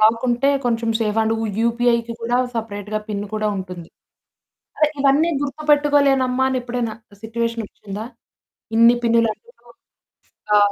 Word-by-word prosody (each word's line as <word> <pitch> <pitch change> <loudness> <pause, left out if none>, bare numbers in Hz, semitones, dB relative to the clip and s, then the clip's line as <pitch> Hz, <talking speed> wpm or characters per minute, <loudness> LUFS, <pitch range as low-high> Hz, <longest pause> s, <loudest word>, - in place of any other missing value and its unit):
Lock 225 +2 +4
ఉంటే 245 +4 +2 0.2
కొంచెం 230 -1 0
safe 215 -1 0
and 220 0 +1
you 225 - -1
యూపీఐకి 235 0 +1
కూడా 240 +1 0 0.2
సెపరేట్‌గా 215 -2 -4
పిన్ 205 -1 -3
కూడా 215 0 -1
ఉంటుంది. 180 -3 -7 0.9
అదే 305 -1 +4
ఇవన్నీ 285 +5 +3
గుర్తుపెట్టుకోలేనమ్మా 285 -3 +2
అని 260 - 0
ఎప్పుడైనా 240 -2 -3 0.3
సిట్యుయేషనోచ్చిందా? 225 -2 -4 0.7
ఇన్ని 235 +1 +7
పిన్నులు 230 -1 +3
ఎందుకు? 480 +1 -23 0.9
ఆ! - - +7
230 Hz, 125 wpm, -21 LUFS, 220-260 Hz, 0.9 s, ఇన్ని